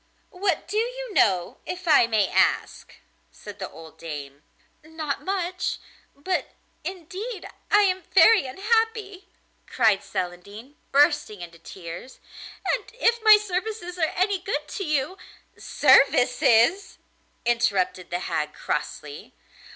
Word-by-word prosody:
'What 370 -4 -1
do 420 - -3
you - - -4
know, 185 - +2
if 365 0 -7
I 290 -7 +6
may 215 -4 +2
ask?' - - 0 0.4
said 205 -1 -12
the 190 - -5
old 160 -1 -14
dame. 145 -3 -8 0.4
'Not 315 -2 -5
much; 370 -1 -2 0.4
but 360 +6 -3 0.3
indeed 375 +5 -6 0.2
I 415 - +5
am 375 -2 +1
very 435 -12 +6
unhappy,' 410 - -1 0.4
cried 220 -5 +2
Celandine, 200 +9 -6 0.2
bursting 285 -8 +2
into 170 -1 -10
tears, 170 +7 -10 0.5
'and - - -2
if 470 -1 +2
my 435 -1 +8
services 375 -2 -4
are 320 - +1
any 380 +1 +1
good 300 -5 -3
to 395 - -4
you 305 +2 -1 0.2
' - - -34
'Services!' 250 - +3 0.5
interrupted 200 -6 0
the 175 +1 -3
hag 150 -4 -2
crossly. 150 0 -5
300 Hz, 120 wpm, -24 LUFS, -, 0.5 s, my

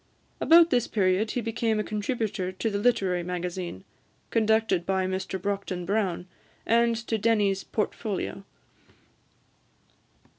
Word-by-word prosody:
About 335 +1 +6
this 245 -3 +2
period 195 +1 +1
he 245 - -2
became 225 -1 -1
a - - 0
contributor 210 -3 -2
to 185 +4 -2
the 200 - -1
"Literary 200 -6 +2
Magazine," 180 - -4 0.5
conducted 220 -4 +2
by 190 +1 0
Mr 190 0 -3
Brockden 195 -2 -3
Brown, 195 -3 -1 0.4
and 235 0 +3
to 225 -1 -1
Denny's 205 -3 +2
"Portfolio." 210 -2 -3
205 Hz, 115 wpm, -27 LUFS, 185-225 Hz, 0.5 s, About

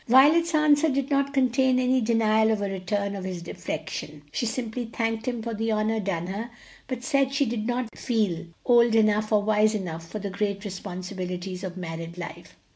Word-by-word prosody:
Violet's 310 +7 +6
answer 305 +1 +4
did 275 0 -1
not 280 0 +2
contain 260 -1 +3
any 255 0 +3
denial 220 -1 +3
of 220 -1 +1
a 200 - -1
return 200 +2 -2
of 195 - -5
his 180 -2 -5
affection; 150 -2 -5
she 235 - -1
simply 235 +1 -3
thanked 225 0 -2
him 240 -3 -2
for 230 0 -3
the 225 +1 -1
honor 215 +1 +1
done 185 -5 -2
her, 205 +6 -4 0.4
but 250 -1 -4
said 275 -1 +2
she 280 0 +2
did 225 -2 -2
not 245 -2 -2
feel 210 -9 -1 0.2
old 235 -2 +5
enough 215 -1 +3
or 210 -1 +4
wise 215 +1 +3
enough 165 -5 -4
for 215 - -5
the 200 -1 -4
great 200 +1 -2
responsibilities 185 -1 -5
of 185 -1 -5
married 165 -1 -6
life. 175 -1 -8
220 Hz, 190 wpm, -26 LUFS, 190-250 Hz, 0.4 s, Violet's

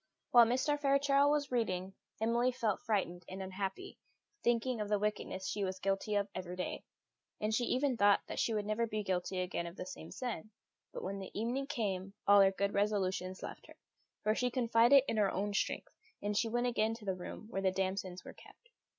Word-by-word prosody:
While 240 -2 +8
Mr. 260 +5 +1
Fairchild 280 0 +4
was 290 -2 +1
reading, 190 -6 -1 0.3
Emily 235 +3 +2
felt 230 -5 -1
frightened 180 -5 -1
and 190 - -6
unhappy, 195 - -5 0.4
thinking 240 0 +1
of 210 - -3
the 210 - +3
wickedness 200 -2 -2
she 200 +2 -2
was 190 -1 -2
guilty 195 +2 -1
of 200 0 +1
every 180 -1 -5
day; 180 - -4 0.5
and 215 +1 -1
she 240 +2 +2
even 260 0 +1
thought 205 -1 +5
that - - -5
she - - +1
never 215 +1 -1
would 230 - +1
be 215 -1 -2
guilty 185 -1 -1
again 180 -1 -2
of 170 - -8
the 180 - -6
same 165 -3 -8
sin; 240 -4 -5 0.4
but - - -6
when 195 +1 -3
the 190 - -7
evening 250 +5 -1
came 195 -7 -2
all 200 0 +7
her 195 0 +6
good 200 +1 -1
resolutions 190 -2 0
left - - -8
her, - - -15 0.5
for 215 +1 +3
she 250 +2 0
confided 240 +2 +5
in 225 - -1
her 205 -2 +4
own 205 +2 -2
strength; - - -1 0.3
and 205 +1 -2
she 225 +2 +2
went 240 +2 0
again 225 -2 +1
to 225 -2 -12
the 190 - 0
room 185 +3 -8
where 195 - -1
the 190 - +3
damsons 185 -1 -2
were - - -8
kept. 480 - -18
210 Hz, 205 wpm, -34 LUFS, 190-240 Hz, 0.5 s, While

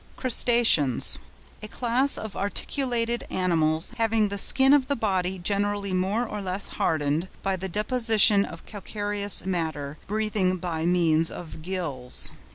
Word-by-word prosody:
CRUSTACEANS.—A 230 - +2
class 250 +5 +1
of 220 -2 -7
articulated 235 +2 -1
animals, 165 -1 0
having 225 -2 +1
the 200 - -5
skin 270 +6 +4
of 275 -3 +3
the 280 - -1
body 190 -5 -1
generally 200 +1 -2
more 195 +6 -1
or 210 -1 -6
less 190 +1 -3
hardened 155 +2 -1 0.2
by 195 -1 -1
the 190 +1 -6
deposition 215 0 +4
of 165 -4 -10
calcareous 205 -1 -4
matter, 155 -5 -4
breathing 210 -3 -1
by 170 -2 -3
means 165 -2 +2
of 160 -2 -9
gills. 155 -8 +1
195 Hz, 130 wpm, -25 LUFS, 170-220 Hz, 0.2 s, skin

